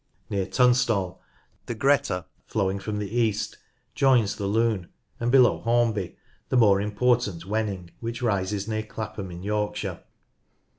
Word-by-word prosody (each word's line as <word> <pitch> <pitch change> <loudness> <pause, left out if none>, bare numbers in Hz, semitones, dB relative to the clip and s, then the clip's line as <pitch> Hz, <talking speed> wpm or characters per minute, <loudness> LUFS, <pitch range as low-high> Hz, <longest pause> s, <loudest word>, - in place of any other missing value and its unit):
Near 100 -2 0
Tunstall 120 -7 +2 0.5
the 120 - -3
Greeta, 115 -8 +2 0.2
flowing 100 -2 0
from 105 +2 -4
the 105 +2 -4
east, 115 -4 0 0.3
joins 125 -7 +3
the 100 - -3
Lune, 110 -3 +1 0.3
and 120 +1 0
below 125 -2 +5
Hornby 115 -5 0 0.3
the 130 - +2
more 100 -4 +5
important 105 -4 +1
Wenning, 100 -4 -2
which 115 +2 -5
rises 100 -2 0
near 110 -1 -1
Clapham 110 -3 -6
in 90 +1 -8
Yorkshire. 105 0 -2
105 Hz, 135 wpm, -26 LUFS, 100-120 Hz, 0.5 s, below